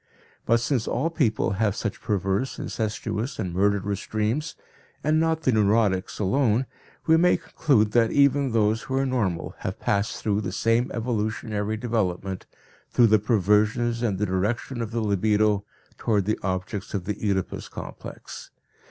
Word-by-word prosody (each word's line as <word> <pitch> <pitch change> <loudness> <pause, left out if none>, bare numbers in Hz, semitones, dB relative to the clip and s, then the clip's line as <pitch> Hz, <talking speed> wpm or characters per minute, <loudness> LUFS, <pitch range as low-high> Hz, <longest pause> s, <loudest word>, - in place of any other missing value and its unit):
But 115 +1 +4
since 120 -1 -1
all 165 - 0
people 120 - +1
have 100 0 0
such 105 - -4
perverse, 100 +4 -1
incestuous 110 +3 -3
and 90 -5 -3
murderous 100 +1 0
dreams, 110 +9 -1 0.5
and 155 +1 +3
not 160 0 +1
the 130 - +3
neurotics 105 -3 +2
alone, 115 +3 +2 0.4
we 160 0 +5
may 180 +2 +4
conclude 135 -9 +1
that 115 0 +3
even 140 -1 +3
those 110 0 +2
who 130 - -4
are 135 0 +2
normal 110 -10 -1
have 95 - -4
passed 105 -1 0
through 105 -1 0
the 105 - -3
same 115 +2 +1
evolutionary 110 -2 -2
development, 95 -5 -2 0.4
through 120 - +4
the 110 - +6
perversions 110 +3 +2
and 105 -6 0
the 105 - 0
direction 110 +6 -1
of 115 - -3
the 115 +1 -2
libidio 105 0 +2 0.3
toward 105 -4 +1
the 110 - 0
objects 95 +2 -3
of 95 -3 -3
the 105 0 -3
Oedipus 95 -3 -1
complex. - - -9
110 Hz, 150 wpm, -25 LUFS, 100-120 Hz, 0.5 s, the